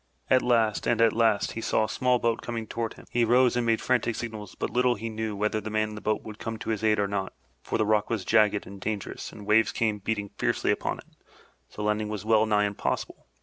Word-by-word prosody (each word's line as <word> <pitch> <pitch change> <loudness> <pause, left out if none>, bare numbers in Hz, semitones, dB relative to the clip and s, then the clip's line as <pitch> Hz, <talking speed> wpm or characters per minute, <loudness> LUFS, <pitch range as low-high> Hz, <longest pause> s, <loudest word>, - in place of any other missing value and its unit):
At 130 -1 +6
last 115 -4 +2
and 120 -1 +2
at 115 -1 +5
last 110 -3 +2
he 115 - -5
saw 110 - +1
a - - -4
small 125 +1 +2
boat 115 -1 0
coming 115 -2 -4
toward 115 +1 -4
him. - - -14
He 120 - +2
rose 125 +2 +4
and 120 -1 0
made 115 -1 +2
frantic 120 -2 +1
signals, 110 -3 -6
but - - -3
little 125 0 +2
he 115 +2 -5
knew 110 -1 -3
whether 105 +1 0
the 110 - -5
man 110 0 0
in - - -8
the 105 - -8
boat 110 0 -1
would 110 -1 -9
come 115 -1 -4
to 110 - -4
his 110 -1 -2
aid 110 -1 +3
or 100 -1 +1
not, 100 -1 -3 0.3
for - - -2
the 110 - +1
rock 105 0 +2
was 110 -5 -2
jagged 105 -2 +3
and 100 +1 -11
dangerous 105 -2 -4
and 105 - -11
the - - -10
waves 110 +2 +4
came 110 -2 0
beating 105 0 -3
fiercely - - +1
upon - - -1
it, - - -13 0.6
so 105 - -7
landing 105 0 0
was 105 -1 -5
well 110 0 +4
nigh 105 -1 +3
impossible. 100 0 -3
110 Hz, 255 wpm, -27 LUFS, 105-115 Hz, 0.6 s, At